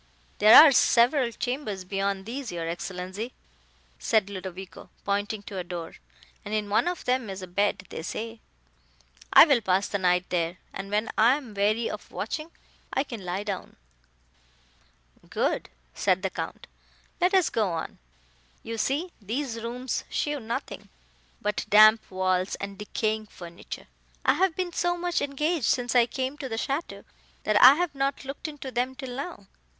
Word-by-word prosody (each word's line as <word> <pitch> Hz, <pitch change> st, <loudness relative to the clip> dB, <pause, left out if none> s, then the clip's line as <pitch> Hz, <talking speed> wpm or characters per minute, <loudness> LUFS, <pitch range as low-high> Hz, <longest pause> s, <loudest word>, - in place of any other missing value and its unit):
"There 215 Hz, +2 st, +8 dB
are 310 Hz, -2 st, +10 dB
several 245 Hz, 0 st, +4 dB
chambers 240 Hz, -5 st, -3 dB
beyond 195 Hz, +1 st, -2 dB
these, 255 Hz, +3 st, -5 dB
your 170 Hz, -1 st, -4 dB
Excellenza," 185 Hz, +5 st, -5 dB, 0.7 s
said 210 Hz, -3 st, +1 dB
Ludovico, 190 Hz, -1 st, -8 dB, 0.2 s
pointing 205 Hz, +1 st, -1 dB
to 195 Hz, -2 st, -6 dB
a -, -, -3 dB
door, 175 Hz, -2 st, -6 dB, 0.5 s
"and 210 Hz, -, -3 dB
in 210 Hz, -1 st, -2 dB
one 215 Hz, -, +3 dB
of 355 Hz, -1 st, -3 dB
them 250 Hz, -3 st, 0 dB
is 190 Hz, -1 st, -6 dB
a -, -, -6 dB
bed, 200 Hz, +2 st, 0 dB
they -, -, -5 dB
say. 225 Hz, +6 st, -5 dB, 0.9 s
I -, -, +10 dB
will 280 Hz, -7 st, +3 dB
pass 190 Hz, -1 st, +1 dB
the 200 Hz, -, -2 dB
night 180 Hz, -1 st, +2 dB
there, 170 Hz, 0 st, -1 dB, 0.2 s
and 195 Hz, 0 st, -6 dB
when 210 Hz, +2 st, 0 dB
I 235 Hz, +4 st, +6 dB
am 260 Hz, -7 st, -8 dB
weary 210 Hz, +3 st, +1 dB
of -, -, -7 dB
watching, 310 Hz, +1 st, -4 dB, 0.4 s
I 270 Hz, -, +1 dB
can 235 Hz, -8 st, -8 dB
lie 180 Hz, +3 st, -3 dB
down." 200 Hz, -3 st, -5 dB, 1.5 s
"Good;" -, -, -1 dB, 0.2 s
said 185 Hz, +1 st, +1 dB
the 190 Hz, -, -1 dB
Count; -, -, -6 dB, 0.5 s
"let 360 Hz, +2 st, +3 dB
us 375 Hz, -3 st, +3 dB
go 215 Hz, -4 st, +1 dB
on. 165 Hz, -1 st, -5 dB, 0.6 s
You 230 Hz, 0 st, -5 dB
see 300 Hz, +10 st, -1 dB
these 230 Hz, +2 st, -3 dB
rooms 245 Hz, +2 st, -3 dB
show 295 Hz, -1 st, -1 dB
nothing, 230 Hz, -1 st, -5 dB, 0.5 s
but 210 Hz, 0 st, -1 dB
damp 215 Hz, +1 st, +7 dB
walls 185 Hz, 0 st, 0 dB
and 200 Hz, 0 st, -6 dB
decaying 215 Hz, +1 st, -2 dB
furniture. 170 Hz, -3 st, -9 dB, 0.4 s
I -, -, +5 dB
have 375 Hz, -3 st, +1 dB
been 360 Hz, -2 st, -3 dB
so 350 Hz, +1 st, 0 dB
much 350 Hz, 0 st, -1 dB
engaged 300 Hz, +1 st, -1 dB
since 245 Hz, -3 st, +1 dB
I 240 Hz, -2 st, +5 dB
came 265 Hz, +3 st, -3 dB
to 270 Hz, -3 st, -5 dB
the 225 Hz, -, -3 dB
château, 275 Hz, +8 st, -3 dB, 0.4 s
that 210 Hz, -1 st, +3 dB
I 260 Hz, +3 st, +10 dB
have 350 Hz, -1 st, -1 dB
not 275 Hz, 0 st, -2 dB
looked 275 Hz, +3 st, -6 dB
into 290 Hz, -3 st, -7 dB
them 255 Hz, +2 st, -1 dB
till 260 Hz, -2 st, -7 dB
now. 280 Hz, -, -6 dB
220 Hz, 165 wpm, -27 LUFS, 195-270 Hz, 1.5 s, are